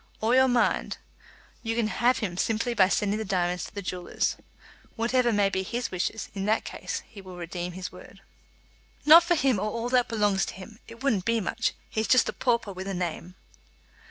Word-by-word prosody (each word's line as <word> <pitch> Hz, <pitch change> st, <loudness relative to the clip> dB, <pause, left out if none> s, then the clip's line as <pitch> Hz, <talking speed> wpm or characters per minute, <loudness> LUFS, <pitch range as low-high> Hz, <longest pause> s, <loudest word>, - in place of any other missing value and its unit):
"Or 225 Hz, +2 st, +1 dB
your 260 Hz, +1 st, +6 dB
mind, 245 Hz, -2 st, +1 dB, 0.6 s
you 225 Hz, -1 st, -2 dB
can 235 Hz, -1 st, +1 dB
have 245 Hz, +3 st, +2 dB
him 205 Hz, -5 st, -2 dB
by -, -, -9 dB
simply 230 Hz, +2 st, 0 dB
sending 205 Hz, +1 st, 0 dB
the -, -, -2 dB
diamonds 180 Hz, -3 st, -1 dB
to -, -, -13 dB
the 200 Hz, -, -5 dB
jewellers. 180 Hz, 0 st, -2 dB, 0.6 s
Whatever 240 Hz, +1 st, +2 dB
may 205 Hz, -2 st, +3 dB
be 190 Hz, -1 st, -1 dB
his 235 Hz, +3 st, -3 dB
wishes, 185 Hz, +4 st, -3 dB
in 195 Hz, -1 st, -3 dB
that 215 Hz, +2 st, +1 dB
case -, -, -5 dB
he 205 Hz, -3 st, -12 dB
will 185 Hz, -1 st, -11 dB
redeem 175 Hz, +1 st, -5 dB
his 185 Hz, +1 st, -6 dB
word." -, -, -14 dB, 0.9 s
"Not 325 Hz, +3 st, +9 dB
for 345 Hz, 0 st, +2 dB
him 270 Hz, -, +2 dB
or 210 Hz, +2 st, -1 dB
all 235 Hz, +2 st, -3 dB
that 250 Hz, -1 st, +3 dB
belongs 205 Hz, -3 st, +1 dB
to -, -, -5 dB
him! 200 Hz, +4 st, -11 dB
It 230 Hz, +3 st, -12 dB
wouldn't 215 Hz, -10 st, +1 dB
be 230 Hz, 0 st, +2 dB
much. 200 Hz, -, -1 dB
He's 220 Hz, 0 st, -2 dB
just 255 Hz, -, +5 dB
a -, -, -3 dB
pauper 235 Hz, -5 st, 0 dB
with 190 Hz, +1 st, -7 dB
a 195 Hz, -, -3 dB
name." 175 Hz, 0 st, -4 dB
215 Hz, 205 wpm, -27 LUFS, 190-235 Hz, 0.9 s, Not